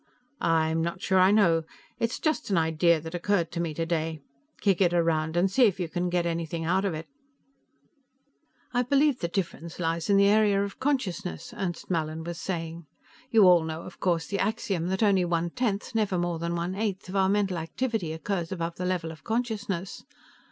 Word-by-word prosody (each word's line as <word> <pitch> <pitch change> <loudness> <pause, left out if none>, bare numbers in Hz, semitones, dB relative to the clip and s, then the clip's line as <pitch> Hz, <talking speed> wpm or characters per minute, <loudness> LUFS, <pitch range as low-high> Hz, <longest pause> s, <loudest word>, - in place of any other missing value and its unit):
"I'm 160 -1 +2
not 170 +3 -2
sure 190 0 +2
I 185 +1 +6
know. 185 -6 +4 0.4
It's 230 +1 0
just 310 -7 -1
an 195 - +2
idea 160 +1 +3
that 160 +2 -8
occurred 175 -1 0
to 170 - -4
me 170 -2 -1
today. 165 -1 -1 0.4
Kick 195 -3 +2
it 175 -2 +3
around 165 -1 +1
and 185 +2 +3
see 255 +4 +5
if 195 -2 -2
you 175 - -1
can 175 +2 -2
get 175 -1 0
anything 165 -1 -2
out 185 +4 +1
of 185 -5 -1
it." 155 +1 -7 1.7
"I 245 - +3
believe 275 +1 +2
the 170 - -1
difference 170 -2 -4
lies 165 +1 -1
in 200 - +5
the 200 - +6
area 205 -1 +4
of 200 -1 -6
consciousness," 245 -4 -2
Ernst 180 -4 -4
Mallin 160 -1 -1
was 170 +1 -6
saying. 165 -3 -4 0.4
"You 225 -4 +5
all 175 -2 +6
know, 160 +1 -5
of 180 - -11
course, 170 -3 +1
the 200 - -3
axiom 195 -5 -1
that 190 +4 0
only 195 -3 +4
one 170 -1 0
tenth, 215 -4 -2
never 210 -5 +1
more 175 -1 -1
than 170 +1 -2
one 170 +2 -2
eighth, 195 -2 -3
of 185 - -7
our 190 -1 +3
mental 195 -3 +1
activity 200 +1 -2
occurs 170 +1 -3
above 170 -2 -3
the 180 - -3
level 180 -3 -1
of 160 - -13
consciousness. 220 -6 -3
180 Hz, 195 wpm, -27 LUFS, 165-200 Hz, 1.7 s, I